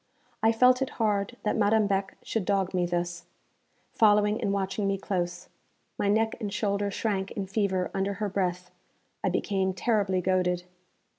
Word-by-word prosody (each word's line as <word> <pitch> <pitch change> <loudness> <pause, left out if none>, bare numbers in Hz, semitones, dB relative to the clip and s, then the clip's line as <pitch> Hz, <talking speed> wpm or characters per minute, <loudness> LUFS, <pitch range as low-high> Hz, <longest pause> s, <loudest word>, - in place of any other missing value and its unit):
I 225 - +5
felt 250 +3 +4
it 265 - 0
hard 210 +1 0
that 210 - 0
Madame 215 0 +3
Beck 195 -1 -1
should 225 - -2
dog 195 -1 0
me 180 -1 +1
thus, 175 0 -3 0.7
following 210 0 +3
and 200 - 0
watching 200 +1 -1
me 195 0 +1
close. 180 -2 -3 0.5
My - - -1
neck 220 +2 +2
and 210 -3 -3
shoulder 200 0 0
shrank 195 -1 -2
in 200 - -3
fever 190 -2 -1
under 195 +1 -1
her 210 +2 -2
breath; 180 -2 -2 0.5
I - - +2
became 190 -2 0
terribly 200 -2 +1
goaded. 180 -1 +1
200 Hz, 160 wpm, -28 LUFS, 185-210 Hz, 0.7 s, I